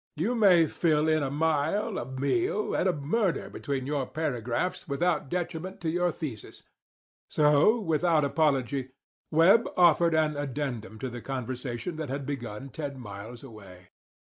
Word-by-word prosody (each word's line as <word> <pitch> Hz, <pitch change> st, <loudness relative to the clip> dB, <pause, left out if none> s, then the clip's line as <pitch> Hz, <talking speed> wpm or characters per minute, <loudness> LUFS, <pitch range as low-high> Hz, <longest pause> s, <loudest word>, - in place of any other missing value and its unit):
You 180 Hz, +11 st, 0 dB
may 190 Hz, -8 st, +5 dB
fill 155 Hz, -1 st, +1 dB
in 155 Hz, 0 st, +3 dB
a 135 Hz, -, -1 dB
mile, 160 Hz, +8 st, 0 dB
a 120 Hz, -, -5 dB
meal, 140 Hz, +10 st, -1 dB
and 190 Hz, -, +2 dB
a -, -, +4 dB
murder 175 Hz, +6 st, -1 dB
between 135 Hz, -3 st, -3 dB
your 140 Hz, -2 st, -1 dB
paragraphs 130 Hz, +1 st, -2 dB
without 150 Hz, 0 st, 0 dB
detriment 180 Hz, +3 st, -4 dB
to 160 Hz, -2 st, -1 dB
your 175 Hz, +1 st, +1 dB
thesis. 140 Hz, -11 st, -7 dB, 0.7 s
So, 150 Hz, +10 st, +4 dB
without 165 Hz, -4 st, +2 dB
apology, 135 Hz, -3 st, 0 dB, 0.4 s
Webb 175 Hz, +9 st, +5 dB
offered 170 Hz, -1 st, +5 dB
an 155 Hz, -2 st, +1 dB
addendum 130 Hz, -6 st, -4 dB
to 130 Hz, -, -3 dB
the 120 Hz, 0 st, -7 dB
conversation 130 Hz, +3 st, -4 dB
that 155 Hz, -3 st, -4 dB
had 140 Hz, +1 st, -3 dB
begun 130 Hz, -2 st, -5 dB
ten 140 Hz, -2 st, -5 dB
miles 110 Hz, +2 st, -9 dB
away. 95 Hz, -7 st, -13 dB
150 Hz, 145 wpm, -28 LUFS, 130-170 Hz, 0.7 s, may